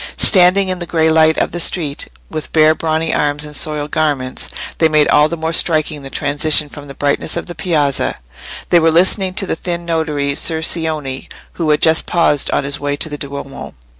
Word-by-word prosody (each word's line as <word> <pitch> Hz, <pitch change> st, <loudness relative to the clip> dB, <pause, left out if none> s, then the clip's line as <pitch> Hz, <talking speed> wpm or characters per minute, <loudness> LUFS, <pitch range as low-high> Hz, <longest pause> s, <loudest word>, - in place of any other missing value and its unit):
Standing 190 Hz, 0 st, +4 dB
in 185 Hz, -1 st, -2 dB
the 175 Hz, -, -6 dB
grey 160 Hz, -1 st, +1 dB
light 160 Hz, 0 st, +3 dB
of -, -, -1 dB
the 175 Hz, -, -4 dB
street, 155 Hz, -4 st, +1 dB, 0.2 s
with 155 Hz, -2 st, -6 dB
bare 155 Hz, 0 st, +4 dB
brawny 160 Hz, 0 st, -2 dB
arms 150 Hz, 0 st, -1 dB
and 150 Hz, 0 st, -8 dB
soiled 150 Hz, -1 st, -2 dB
garments, 145 Hz, -5 st, -2 dB, 0.3 s
they 160 Hz, -, +3 dB
made 155 Hz, -1 st, +3 dB
all 150 Hz, +1 st, +4 dB
the 170 Hz, -, -4 dB
more 160 Hz, +1 st, -3 dB
striking 155 Hz, -3 st, +2 dB
the 135 Hz, -, -9 dB
transition 150 Hz, +2 st, +1 dB
from 145 Hz, 0 st, -11 dB
the 140 Hz, -, -10 dB
brightness 145 Hz, +3 st, -1 dB
of -, -, -4 dB
the 175 Hz, -, -8 dB
Piazza. 155 Hz, -6 st, -1 dB, 0.5 s
They 175 Hz, -, +5 dB
were 165 Hz, 0 st, +3 dB
listening 185 Hz, +3 st, +3 dB
to 195 Hz, -, +1 dB
the -, -, -2 dB
thin 170 Hz, 0 st, -5 dB
notary, 155 Hz, -4 st, -2 dB
Ser 160 Hz, +2 st, 0 dB
Cioni, 155 Hz, -5 st, -2 dB, 0.2 s
who 165 Hz, -3 st, -3 dB
had 150 Hz, -, +1 dB
just 160 Hz, 0 st, +2 dB
paused 155 Hz, -5 st, +2 dB
on -, -, 0 dB
his 140 Hz, +1 st, -3 dB
way 145 Hz, 0 st, -2 dB
to 155 Hz, -, -1 dB
the 145 Hz, -, -6 dB
Duomo. 140 Hz, -1 st, -7 dB
155 Hz, 205 wpm, -15 LUFS, 145-165 Hz, 0.5 s, They